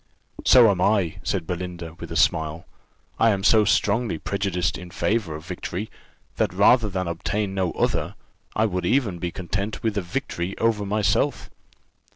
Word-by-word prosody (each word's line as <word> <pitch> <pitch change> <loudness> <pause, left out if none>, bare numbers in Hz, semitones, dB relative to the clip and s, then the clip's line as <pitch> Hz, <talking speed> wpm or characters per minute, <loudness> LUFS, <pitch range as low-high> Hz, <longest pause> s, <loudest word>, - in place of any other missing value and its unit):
"So 120 -4 +7
am 90 -2 -2
I," 95 -5 +2
said - - -2
Belinda, 90 -1 -5
with - - -8
a - - -4
smile; 80 +2 +1 0.5
"I 115 - +5
am 100 -3 0
so 110 0 +5
strongly 105 -1 +1
prejudiced 95 -1 -1
in 90 -1 -8
favour 100 -3 -1
of 80 +1 -9
victory, 90 +3 -5 0.5
that - - +1
rather 115 -4 +4
than 95 -2 -2
obtain 95 +4 -2
no 95 -3 0
other, - - -1 0.4
I 110 - +3
would 90 -4 -2
even 110 -9 +1
be 85 - -2
content 100 +4 -4
with 110 -2 0
a 100 - 0
victory 90 -2 -4
over 110 -3 +1
myself." 105 +1 0
95 Hz, 165 wpm, -24 LUFS, 90-105 Hz, 0.5 s, So